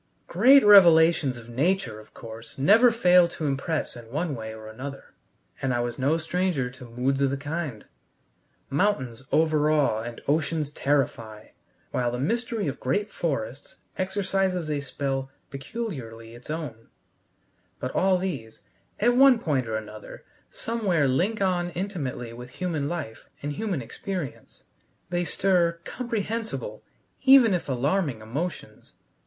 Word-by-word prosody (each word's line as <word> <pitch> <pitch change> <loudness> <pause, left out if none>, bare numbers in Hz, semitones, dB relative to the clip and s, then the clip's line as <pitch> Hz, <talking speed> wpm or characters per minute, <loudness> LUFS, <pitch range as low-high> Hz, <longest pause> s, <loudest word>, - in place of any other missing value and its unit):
Great 255 +8 +6
revelations 165 -8 +7
of 115 -1 -12
nature, 130 - 0
of 110 - -16
course, 115 0 -9
never 210 - +6
fail 180 -6 +5
to 165 -2 -6
impress 145 +3 -2
in 120 -2 -11
one 155 +4 -2
way 110 -3 -6
or 110 0 -10
another, 130 +6 -8 0.5
and 130 -2 0
I - - 0
was 120 +1 -4
no 140 +5 +2
stranger 165 -6 -1
to 125 0 -12
moods 125 +4 -1
of 140 - +3
the 140 - -2
kind. 145 -5 -5 0.9
Mountains 135 - 0
overawe 150 -6 +2
and 120 0 -7
oceans 150 0 0
terrify, 120 -7 -1 0.4
while 125 -1 0
the 120 - -3
mystery 225 - -1
of 140 0 -4
great 205 +12 -1
forests 135 -5 -4 0.2
exercises 190 -3 -1
a 145 -1 -1
spell 135 -1 -3 0.2
peculiarly 135 - -6
its 120 +4 -14
own. 150 -8 -5 0.9
But 130 - -3
all 190 0 +3
these, 140 -12 -5 0.4
at 240 +3 +3
one 270 -1 +7
point 140 - -1
or 110 - -2
another, 110 0 -8 0.3
somewhere 195 -10 0
link 195 +11 +1
on 175 -2 +1
intimately 155 - -4
with 125 +1 -9
human 160 -6 -2
life 150 -10 -6
and 145 0 -2
human 185 - -2
experience. 175 - -6 0.5
They 175 0 0
stir 180 -1 +2
comprehensible, 220 - -4 0.4
even 265 -5 +7
if 175 -5 -2
alarming, 140 - 0
emotions. 145 +11 -6
150 Hz, 135 wpm, -26 LUFS, 125-185 Hz, 0.9 s, revelations